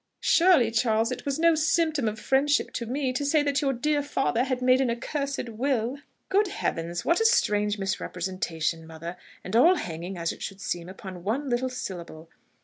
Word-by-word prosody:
"Surely, 330 Hz, -10 st, +5 dB
Charles, 225 Hz, 0 st, +2 dB
it 250 Hz, -, -5 dB
was 275 Hz, -, 0 dB
no 335 Hz, +1 st, +4 dB
symptom 315 Hz, -4 st, +1 dB
of 215 Hz, 0 st, -3 dB
friendship 280 Hz, +5 st, +1 dB
to 235 Hz, -, -4 dB
me, 260 Hz, +1 st, -1 dB
to 260 Hz, -, -2 dB
say 290 Hz, +1 st, +3 dB
that 285 Hz, 0 st, +1 dB
your 275 Hz, -2 st, +1 dB
dear 290 Hz, +4 st, 0 dB
father 270 Hz, -4 st, 0 dB
had 255 Hz, -2 st, -1 dB
made 255 Hz, +1 st, +4 dB
an 260 Hz, -, +1 dB
accursed 275 Hz, +3 st, -3 dB
will!" 245 Hz, +2 st, -1 dB, 0.3 s
"Good 405 Hz, +2 st, +2 dB
heavens!... 170 Hz, -, -3 dB
what 340 Hz, -, +3 dB
a -, -, +2 dB
strange 210 Hz, -, +2 dB
misrepresentation, 175 Hz, -4 st, -3 dB
mother!... 165 Hz, +2 st, -7 dB, 0.3 s
and 185 Hz, -, -4 dB
all 330 Hz, +10 st, +6 dB
hanging, 175 Hz, -, -5 dB
as 170 Hz, -1 st, -1 dB
it -, -, -11 dB
should 195 Hz, -1 st, -6 dB
seem, 175 Hz, -2 st, -4 dB
upon 185 Hz, -2 st, -9 dB
one 255 Hz, +7 st, -2 dB
little 250 Hz, +2 st, 0 dB
syllable!... 170 Hz, -9 st, -7 dB
240 Hz, 185 wpm, -26 LUFS, 190-285 Hz, 0.3 s, all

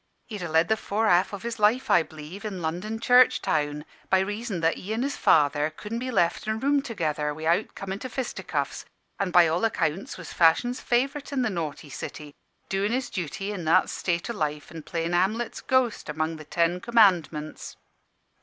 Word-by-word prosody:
He'd 210 Hz, -5 st, -7 dB
a 175 Hz, -, -4 dB
led 160 Hz, +1 st, +3 dB
the 220 Hz, -, +2 dB
fore 215 Hz, +1 st, -1 dB
half 180 Hz, -1 st, +4 dB
o' 200 Hz, -, -4 dB
his 230 Hz, +2 st, -5 dB
life, 215 Hz, +5 st, +3 dB
I -, -, +6 dB
b'lieve, 160 Hz, +5 st, -9 dB
in 205 Hz, -4 st, -4 dB
London 180 Hz, +8 st, -3 dB
church 250 Hz, +2 st, +5 dB
town, 150 Hz, 0 st, -1 dB, 0.2 s
by 190 Hz, -, +5 dB
reason 205 Hz, 0 st, -3 dB
that 165 Hz, 0 st, +2 dB
he 210 Hz, +4 st, -4 dB
an' 235 Hz, -, -1 dB
his 280 Hz, +1 st, -2 dB
father 145 Hz, 0 st, +3 dB
couldn' 210 Hz, +9 st, -6 dB
be 255 Hz, +1 st, -4 dB
left 175 Hz, -3 st, +1 dB
in 220 Hz, -, +1 dB
a -, -, -4 dB
room 280 Hz, +4 st, +2 dB
together 155 Hz, -, -2 dB
wi'out 165 Hz, +6 st, 0 dB
comin' 195 Hz, 0 st, -5 dB
to 255 Hz, -, -6 dB
fisticuffs: 255 Hz, 0 st, -3 dB, 0.4 s
an' 195 Hz, -, 0 dB
by 175 Hz, -2 st, +6 dB
all 165 Hz, +5 st, 0 dB
accounts 185 Hz, -5 st, -1 dB
was 180 Hz, -, -9 dB
fashion's 210 Hz, +10 st, +3 dB
favourite 275 Hz, +5 st, 0 dB
in 270 Hz, -3 st, 0 dB
the 230 Hz, -, 0 dB
naughty 155 Hz, -4 st, -5 dB
city, 150 Hz, +2 st, -7 dB, 0.3 s
doin' 195 Hz, +2 st, 0 dB
his 255 Hz, +1 st, -2 dB
duty 190 Hz, +2 st, -4 dB
in 190 Hz, -4 st, -5 dB
that 170 Hz, +4 st, +3 dB
state 170 Hz, -2 st, -2 dB
o' 235 Hz, -, -3 dB
life 150 Hz, -7 st, -3 dB
an' 165 Hz, -2 st, -7 dB
playing 165 Hz, +2 st, -3 dB
Hamlet's 210 Hz, +7 st, 0 dB
ghost 255 Hz, -9 st, +1 dB
among 155 Hz, +2 st, -2 dB
the 155 Hz, -, -11 dB
Ten 170 Hz, +3 st, +1 dB
Commandments. 180 Hz, -10 st, +2 dB
185 Hz, 195 wpm, -26 LUFS, 160-225 Hz, 0.4 s, I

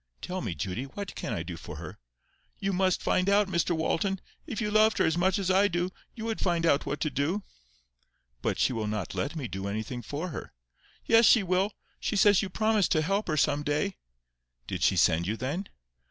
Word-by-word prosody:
"Tell 185 Hz, +1 st, -4 dB
me, 95 Hz, -8 st, -3 dB
Judy, 95 Hz, -, -3 dB
what 200 Hz, +8 st, -7 dB
CAN -, -, -5 dB
I -, -, -2 dB
do -, -, -6 dB
for -, -, -8 dB
her?" -, -, -9 dB, 0.6 s
"You 195 Hz, 0 st, -1 dB
must 185 Hz, 0 st, +1 dB
find 185 Hz, +1 st, +2 dB
out, 205 Hz, 0 st, +4 dB
Mr 170 Hz, -2 st, +1 dB
Walton. 190 Hz, +4 st, 0 dB, 0.3 s
If 245 Hz, -7 st, -4 dB
you 210 Hz, -2 st, -1 dB
loved 215 Hz, +1 st, +4 dB
her -, -, +3 dB
as 160 Hz, -, +2 dB
much 185 Hz, +2 st, +2 dB
as 190 Hz, -2 st, 0 dB
I 195 Hz, +2 st, +5 dB
do, 175 Hz, 0 st, -1 dB, 0.2 s
you 225 Hz, -2 st, -6 dB
would 225 Hz, -1 st, -2 dB
find 170 Hz, -2 st, +1 dB
out 145 Hz, -3 st, +3 dB
what 150 Hz, -, -2 dB
to 155 Hz, -, 0 dB
do." 150 Hz, +10 st, -1 dB, 1.0 s
"But -, -, -1 dB
she -, -, +2 dB
will 110 Hz, -2 st, -2 dB
not 105 Hz, -5 st, -3 dB
let 145 Hz, +4 st, -2 dB
me 145 Hz, -6 st, -3 dB
do 95 Hz, -1 st, -5 dB
anything 110 Hz, +4 st, -4 dB
for 145 Hz, +10 st, -4 dB
her." 150 Hz, -, -7 dB, 0.5 s
"Yes, 230 Hz, -1 st, +6 dB
she 225 Hz, -, +6 dB
will. 190 Hz, +3 st, +1 dB, 0.3 s
She -, -, -2 dB
says 205 Hz, -1 st, +5 dB
you 195 Hz, -, -3 dB
promised 215 Hz, 0 st, +2 dB
to 155 Hz, -2 st, +2 dB
help 195 Hz, +6 st, 0 dB
her 155 Hz, -3 st, 0 dB
some 145 Hz, 0 st, +2 dB
day." 150 Hz, +7 st, -1 dB, 0.7 s
"Did -, -, -4 dB
she -, -, +4 dB
send 85 Hz, +2 st, +3 dB
you, 110 Hz, +3 st, -1 dB
then?" 150 Hz, -, -3 dB
180 Hz, 215 wpm, -28 LUFS, 140-200 Hz, 1.0 s, Yes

